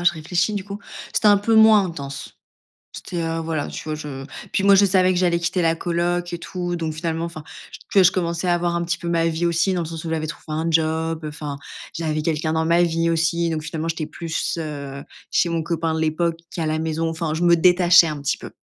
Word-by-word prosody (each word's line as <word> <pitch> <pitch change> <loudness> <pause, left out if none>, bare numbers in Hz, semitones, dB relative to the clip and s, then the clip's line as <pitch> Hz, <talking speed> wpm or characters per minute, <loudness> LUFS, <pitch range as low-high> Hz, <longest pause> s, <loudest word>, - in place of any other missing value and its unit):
oh, 175 - -5
je 170 - +5
réfléchis 175 +6 -1
du 195 -2 -3
coup. 200 0 -7 0.3
C'était 210 - +3
un 205 - +7
peu 225 +3 +1
moins 220 -2 +7
intense. 140 -6 -6 0.6
C'était, 170 -2 -4
heu, 165 0 -2
voilà, 160 -2 -2
tu - - -7
vois, 155 -1 -3
je 145 -3 -7 0.3
puis 195 - 0
moi, 200 0 +7
je 200 +1 +6
savais 185 -1 +3
que 180 - 0
j'allais 175 -2 +2
quitter 175 +1 0
la 165 0 +3
coloc 175 +1 -1
et 175 - -3
tout 175 0 -4
donc 160 -2 -3
finalement, 165 +1 -2
enfin, 160 -3 -8 0.5
que 195 -2 +6
je 180 - +6
commençais 170 -1 -2
à 175 - +3
avoir 175 0 0
un 170 - 0
petit 170 0 -2
peu 170 -1 -4
ma 165 -1 +2
vie 165 +1 0
aussi 170 +3 +1
dans 175 - -1
le 160 - -4
sens 165 0 -7
où 165 - -3
j'avais 155 -1 -1
trouvé 150 - -8
un 160 +2 -1
job, 160 0 0
heu, - - -2
enfin, 150 -2 -6 0.4
j'avais 155 -2 -2
quelqu'un 155 0 -1
dans 160 0 +1
ma 170 +1 +4
vie 165 0 +1
aussi. 170 +1 +1
Donc 155 -1 -3
finalement, 160 0 -4
j'étais 165 -1 -2
plus, 165 +1 -3
heu, 140 -3 -6 0.3
chez 175 - +2
mon 165 -1 -1
copain 165 0 -1
de - - -2
l'époque 165 +1 0
qu'à 165 -3 -2
la 155 0 0
maison. 160 +1 -1
Enfin, 160 -1 -3
je 160 - -3
me 170 0 +6
détachais 175 0 +6
un 150 -2 -4
petit 140 - 0
peu - - -10
165 Hz, 250 wpm, -22 LUFS, 160-175 Hz, 0.6 s, un